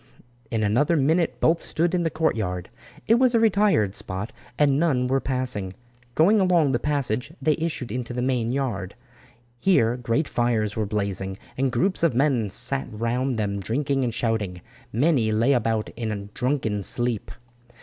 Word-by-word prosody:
In 110 -2 -1
another 125 +11 +2
minute 160 +4 +1
both 165 +1 +3
stood 170 +2 -1
in 180 - +2
the 165 - +1
courtyard. 110 - -1 0.4
It 230 +2 +5
was 255 -2 +3
a - - +5
retired 200 - +3
spot, 100 +2 -5 0.3
and 140 -2 +3
none 140 -7 +2
were 135 +2 +1
passing. 125 -9 -2 0.4
Going 200 +7 +5
along 175 -7 +3
the 120 - +1
passage 130 -4 -1
they 150 +2 +2
issued 155 -8 -3
into 125 +1 -4
the 125 0 -2
main 125 -3 0
yard. 115 -8 -3 0.6
Here 120 -11 +3
great 125 +5 0
fires 115 -3 0
were 110 -2 -1
blazing, 100 -2 -3 0.2
and 135 0 0
groups 155 +11 0
of 165 -8 +2
men 125 -6 +2
sat 135 +7 -1
round 120 +3 -1
them 100 -2 -1
drinking 135 +6 -1
and 120 - 0
shouting. 110 -6 -2 0.3
Many 125 -3 +2
lay 115 +6 +3
about 115 -3 0
in 105 -3 -4
drunken 125 -6 -1
sleep. 120 +2 -1
125 Hz, 160 wpm, -24 LUFS, 110-150 Hz, 0.6 s, It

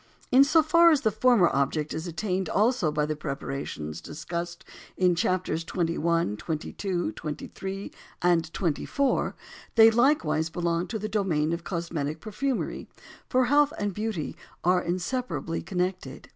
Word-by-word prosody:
In 260 +2 +8
so 310 +3 +4
far 335 +2 +6
as 305 -4 +3
the 220 - +2
former 220 -4 +4
object 145 +2 0
is 160 +3 -4
attained 185 +2 -2
also 215 -6 +2
by 150 0 0
the 155 0 -2
preparations 135 - -5
discussed 170 +2 -6 0.3
in 180 -1 +4
Chapters 175 -1 0
XXI., 165 - 0
XXII., 175 +3 -3
XXIII., 190 +6 -6 0.3
and 170 -2 +2
XXIV., 195 - 0 0.4
they 225 -1 +8
likewise 200 - +2
belong 170 +1 -1
to 220 - -3
the 215 0 -3
domain 175 -7 0
of 170 0 -4
cosmetic 165 -4 -3
perfumery; 245 - -3 0.4
for 255 0 +3
health 290 +3 +4
and 205 -1 -2
beauty 210 -6 -3 0.3
are 180 +1 +3
inseparably 180 0 -2
connected. 180 -7 -3
180 Hz, 135 wpm, -27 LUFS, 160-220 Hz, 0.4 s, In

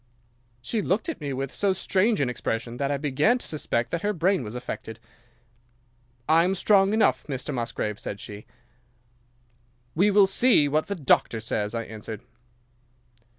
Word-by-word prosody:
"'She 220 - -1
looked 205 - -1
at 320 - -5
me 145 -1 -3
with 135 0 -4
so 200 -2 +1
strange 195 +3 +1
an 135 - +1
expression 120 -1 -3
that 140 +2 -1
I 145 - 0
began 150 - +2
to - - -7
suspect 120 -6 -1
that 170 - -2
her 210 +2 0
brain 185 -2 +1
was 110 +1 -7
affected. 115 -2 -6 1.3
"'"I 165 +1 +5
am 185 +2 +1
strong 195 +1 +4
enough, 220 0 +2
Mr. 140 +1 -4
Musgrave," 115 -4 -3
said 100 - -6
she. 105 0 -9 1.5
"'"We 190 +6 +3
will 200 -1 +6
see 195 - +4
what 155 +2 0
the 200 - -3
doctor 135 - +2
says," 110 0 -3
I 115 - -2
answered. 110 -1 -8
145 Hz, 160 wpm, -25 LUFS, 120-195 Hz, 1.5 s, will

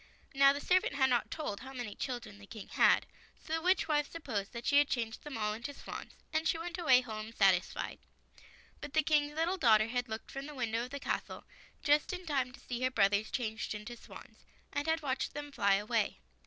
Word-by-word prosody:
Now 275 0 +7
the 285 - -2
servant 365 -1 +2
had 265 -2 +3
not 240 - +2
told 295 -11 -4
how 265 +1 -9
many 245 -5 -5
children 240 -5 -5
the 205 - -13
King 215 -2 -9
had, - - +4 0.3
so 315 - -7
the 325 - +1
witch 365 +3 +3
wife 295 -2 +1
supposed 210 -12 -4
that 235 +1 -7
she 285 0 +5
had 290 - +4
changed 230 -3 -2
them 295 -5 -6
all 210 -1 0
into 240 +6 -6
swans, - - -8 0.2
and 315 0 +1
she 330 - +2
went 335 +1 -5
away 260 -7 +6
home 220 -2 -6
satisfied. - - +2 0.8
But 290 - -8
the 315 - +4
King's 295 -1 +2
little 335 +4 +1
daughter 220 -7 +5
had 245 0 -2
looked 220 0 -6
from 275 +1 -6
the 300 - -9
window 235 -2 -1
of - - -10
the 280 +2 -5
castle - - -3 0.4
just 295 +5 +3
in 365 0 -6
time 270 -5 0
to 255 - -14
see 245 0 -5
her 255 - +3
brothers 205 -3 +2
changed 220 -3 -3
into 210 +3 -7
swans, - - -14 0.3
and 285 +2 -1
had 320 -1 +1
watched 270 -1 -2
them 290 0 -5
fly 200 -7 +3
away. 210 +1 0
260 Hz, 220 wpm, -33 LUFS, 225-295 Hz, 0.8 s, Now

